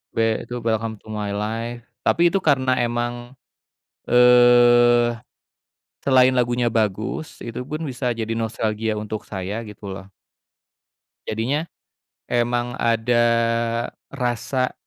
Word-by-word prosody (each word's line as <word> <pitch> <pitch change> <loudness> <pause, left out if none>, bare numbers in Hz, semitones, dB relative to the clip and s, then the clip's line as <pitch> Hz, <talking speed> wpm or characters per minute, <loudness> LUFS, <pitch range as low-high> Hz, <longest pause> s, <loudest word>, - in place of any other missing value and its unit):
We 115 -1 +1
itu 125 - -6
Welcome 115 -1 -2
to - - -17
My 105 -1 -3
Life. 115 +3 -4 0.2
Tapi 170 +1 +3
itu 195 - +1
karena 130 -5 +2
emang, 120 +1 -3 0.7
eee, 120 -1 +5 0.9
selain 130 -1 +5
lagunya 120 -1 +1
bagus, 110 +6 -2
itu 120 +1 -6
pun 155 +4 -5
bisa 125 -1 -2
jadi 115 -1 -3
nostalgia 110 -1 -2
untuk 105 0 -5
saya, 100 +3 -5
gitu 105 -2 -10
loh. 95 0 -8 1.2
Jadinya 130 +9 -1 0.6
emang 120 0 0
ada 120 +1 +2 0.8
rasa, 130 0 -2
120 Hz, 110 wpm, -22 LUFS, 110-125 Hz, 1.2 s, eee